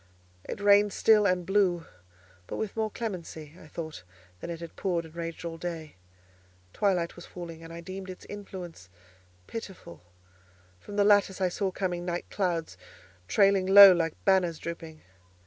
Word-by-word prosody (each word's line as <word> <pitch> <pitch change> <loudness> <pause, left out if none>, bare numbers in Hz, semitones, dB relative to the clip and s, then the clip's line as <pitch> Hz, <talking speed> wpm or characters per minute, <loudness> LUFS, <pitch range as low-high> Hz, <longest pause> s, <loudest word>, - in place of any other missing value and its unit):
It - - -4
rained 205 0 +5
still, 210 -2 +4
and 180 -2 0
blew; 185 -4 +2 0.6
but - - -5
with 215 -3 -4
more 220 -1 0
clemency, 170 -9 -6
I - - -13
thought, 155 - -7 0.4
than - - -7
it 170 -1 -5
had 170 -1 -9
poured 175 -4 -1
and 160 - -14
raged 170 0 -6
all 165 -1 -5
day. 165 -3 -5 0.8
Twilight 180 -5 0
was 175 - -11
falling, 165 -2 -9
and 165 - -10
I 170 0 -8
deemed 190 +2 -8
its 185 - -9
influence 185 - -9 0.6
pitiful; 190 - -9 0.8
from 205 - -10
the 205 - +4
lattice 200 -2 +4
I 185 -1 +2
saw 195 +2 -1
coming 180 -2 -3
night 175 0 -4
clouds 170 - -2 0.5
trailing 195 - +3
low 200 0 +11
like 165 -3 0
banners 185 -4 +3
drooping. 165 -1 -8
180 Hz, 160 wpm, -28 LUFS, 165-200 Hz, 0.8 s, low